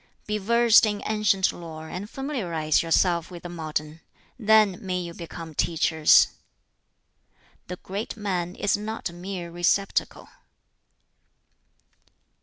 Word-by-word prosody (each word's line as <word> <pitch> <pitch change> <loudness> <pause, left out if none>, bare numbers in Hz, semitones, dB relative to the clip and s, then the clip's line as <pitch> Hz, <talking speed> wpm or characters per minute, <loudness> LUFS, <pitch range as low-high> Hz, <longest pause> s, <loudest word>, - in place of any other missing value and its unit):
"Be 210 0 -2
versed 230 +2 +5
in 210 -1 -3
ancient 210 -3 +2
lore, 160 -2 -9
and 190 +6 -6
familiarize 180 - -1
yourself 170 0 +1
with 175 -2 -10
the 175 - -6
modern; 155 -1 -5 0.4
then 215 -4 +4
may 185 -1 -2
you 170 -1 -6
become 165 -1 -9
teachers. 160 0 +4 1.4
"The 180 - -5
great 200 +5 -6
man 185 -4 -3
is 205 - +1
not 215 -3 -5
a - - -14
mere 175 -1 -6
receptacle." 175 +3 0
180 Hz, 115 wpm, -25 LUFS, 170-210 Hz, 1.4 s, versed